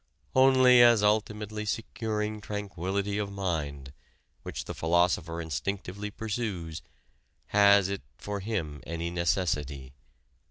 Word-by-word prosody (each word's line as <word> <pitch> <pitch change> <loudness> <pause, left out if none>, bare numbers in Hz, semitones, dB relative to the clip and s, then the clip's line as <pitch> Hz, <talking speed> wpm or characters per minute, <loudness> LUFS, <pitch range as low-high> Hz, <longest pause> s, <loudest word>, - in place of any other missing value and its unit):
Only 130 -1 +7
as 120 -3 +6
ultimately 105 0 0
securing 105 0 -3
tranquillity 100 -1 -3
of 100 -1 -3
mind, 75 -8 -3 0.5
which - - -6
the - - -5
philosopher 85 0 +1
instinctively 95 +5 -4
pursues, 100 -7 -4 0.7
has 100 -2 +5
it 100 0 -3 0.2
for 100 0 -4
him 95 -9 -3
any 85 +1 -3
necessity. 75 -6 -1
100 Hz, 105 wpm, -28 LUFS, 85-105 Hz, 0.7 s, Only